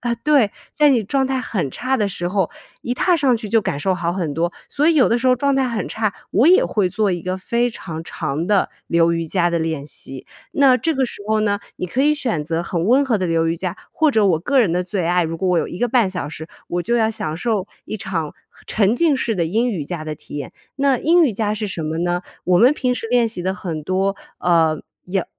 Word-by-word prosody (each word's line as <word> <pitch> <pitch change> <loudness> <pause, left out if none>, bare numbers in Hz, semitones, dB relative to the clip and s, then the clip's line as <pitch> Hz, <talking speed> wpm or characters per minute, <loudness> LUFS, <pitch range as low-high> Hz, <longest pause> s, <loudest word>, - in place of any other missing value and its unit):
啊， 240 0 -1
对， 240 -3 +2 0.6
状 270 -1 +1
态 265 0 -1
很 190 - -2
差 260 - -1
的 210 -4 +1
时 175 -2 -3
候， 190 -2 0 0.3
一 245 - -2
踏 350 +6 +2
上 265 -6 +3
去 220 -2 -6
就 225 0 +3
感 145 -7 -3
受 190 +4 +1
好 170 -1 -2
很 175 -5 -2
多。 170 +3 0 0.2
所 295 +2 0
以 335 - +4
有 280 -5 +5
的 235 - +2
时 260 - -1
候 255 - +6
状 275 +2 +1
态 265 -1 +2
很 230 -2 -3
差， 215 -2 -1 0.2
我 235 +8 +3
也 365 +3 +6
会 200 -4 +1
做 205 +2 0
一 175 -2 -2
个 185 +1 -2
非 235 +5 0
常 165 -7 -7
长 150 +3 -3
的 205 -1 +2 0.2
流 170 0 +3
瑜 165 0 -1
伽 175 +1 +1
的 170 - 0
练 160 -3 -2
习。 135 -2 -5 0.3
那 270 -3 +5
这 325 +5 -1
个 265 -1 +1
时 235 - -6
候 215 0 +2
呢， 205 -1 +1 0.2
你 180 - -3
可 250 +9 0
以 300 +1 +4
选 235 - -2
择 165 +2 -1
很 170 -1 -2
温 265 +5 +4
和 230 -6 +1
的 185 - -1
流 165 -1 +1
瑜 165 - -1
伽， 185 +1 -4
或 315 -2 +2
者 220 -5 +3
我 175 -5 +3
个 265 - +2
人 205 - +2
的 180 +1 0
最 180 -1 -2
爱， 175 0 +2
如 165 +1 -3
果 185 +2 -1
我 180 - +3
有 - - 0
1 - - -7
个 245 - +1
半 235 -4 +3
小 180 -6 -4
时， 160 +1 -7 0.2
我 175 0 -1
就 235 - 0
要 225 -2 +2
享 160 -7 -3
受 210 0 -1 0.2
一 - - -5
场 165 -7 -3 0.3
沉 210 0 +2
浸 310 0 +2
式 235 -3 -1
的 175 -4 0
阴 225 +9 +1
瑜 185 -9 -3
伽 155 0 -5
的 155 - -4
体 145 - -11
验。 140 - -6 0.2
那 275 -3 +2
阴 335 +2 +4
瑜 255 - +1
伽 210 0 -1
是 215 0 -3
什 175 -4 -4
么 155 +1 -3
呢？ 175 +1 0 0.2
我 180 0 +3
们 250 +8 +6
平 250 -4 0
时 230 - -5
练 245 -1 +4
习 215 -6 -4
的 185 - 0
很 165 -6 -5
多， 190 +4 0 0.2
呃， 165 -3 +2 0.3
有 185 0 -1
195 Hz, 270 characters per minute, -20 LUFS, 170-245 Hz, 0.6 s, 候